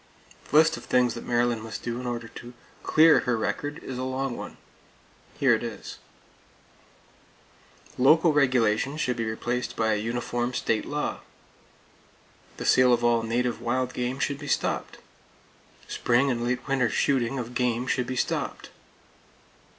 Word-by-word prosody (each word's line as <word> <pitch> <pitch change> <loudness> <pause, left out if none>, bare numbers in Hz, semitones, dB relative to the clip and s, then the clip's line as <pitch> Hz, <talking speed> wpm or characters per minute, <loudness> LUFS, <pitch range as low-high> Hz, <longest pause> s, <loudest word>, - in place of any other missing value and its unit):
The - - -3
list 160 +1 +5
of - - -11
things 125 -1 +2
that - - -8
Maryland 120 -1 +1
must 110 -2 -7
do 120 0 -3
in 125 - -5
order 120 -1 -4
to 120 +3 -11 0.3
clear 160 +1 +5
her 125 -2 0
record 145 +6 -3
is 130 -1 -6
a - - -2
long 130 -1 -2
one. - - -8 0.8
Here - - +4
it - - 0
is: - - -7 2.0
Local 155 +5 +5
regulations 130 0 +2
should 125 -5 0
be 115 - -2
replaced 120 +3 -3
by 110 -1 +1
a - - 0
uniform 120 +2 -2
state 110 -1 -1
law. 150 0 -2 1.4
The - - -5
sale 130 -1 +5
of 120 - +1
all 120 -1 +3
native 120 +1 -1
wild 125 +1 -1
game 125 +1 -2
should 140 0 -2
be 145 - -8
stopped. - - -1 0.9
Spring 125 +3 +1
and 120 -1 -2
late 125 +1 -2
winter 135 -4 +1
shooting 135 0 +1
of 125 -1 -5
game 125 0 0
should 125 -1 -1
be 130 - -3
stopped. - - -3
125 Hz, 155 wpm, -26 LUFS, 120-130 Hz, 2.0 s, list